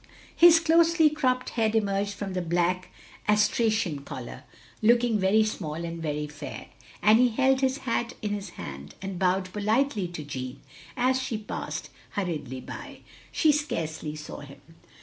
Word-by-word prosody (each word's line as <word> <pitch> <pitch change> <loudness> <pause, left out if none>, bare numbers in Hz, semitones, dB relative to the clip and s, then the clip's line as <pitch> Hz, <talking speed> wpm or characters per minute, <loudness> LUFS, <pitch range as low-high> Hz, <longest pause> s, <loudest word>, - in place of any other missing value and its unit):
His 335 -1 +8
closely 330 -1 +4
cropped 255 -4 0
head 225 -2 0
emerged 200 -1 0
from 200 -2 -5
the 185 - -1
black 175 +2 0 0.4
astrachan 210 -6 +2
collar, - - -8 0.4
looking 235 0 +4
very 200 +3 +4
small 170 -8 -3
and 165 0 -5
very 150 -1 -2
fair; 150 -2 -8 0.3
and 215 +2 +6
he 250 - +6
held 265 +3 +2
his 265 0 +2
hat 235 -1 -1
in 210 - -1
his 205 -2 -4
hand, 70 +1 -8
and 190 0 -5
bowed 185 0 +1
politely 215 0 +1
to 170 -3 -7
Jeanne, 130 -3 -6 0.4
as 255 +1 +2
she 235 -3 -2
passed 210 -1 -5 0.2
hurriedly 155 -9 -3
by. - - -9 0.3
She 315 - +4
scarcely 160 - -2
saw 150 -1 -8
him. 140 -1 -12
205 Hz, 150 wpm, -27 LUFS, 165-245 Hz, 0.4 s, His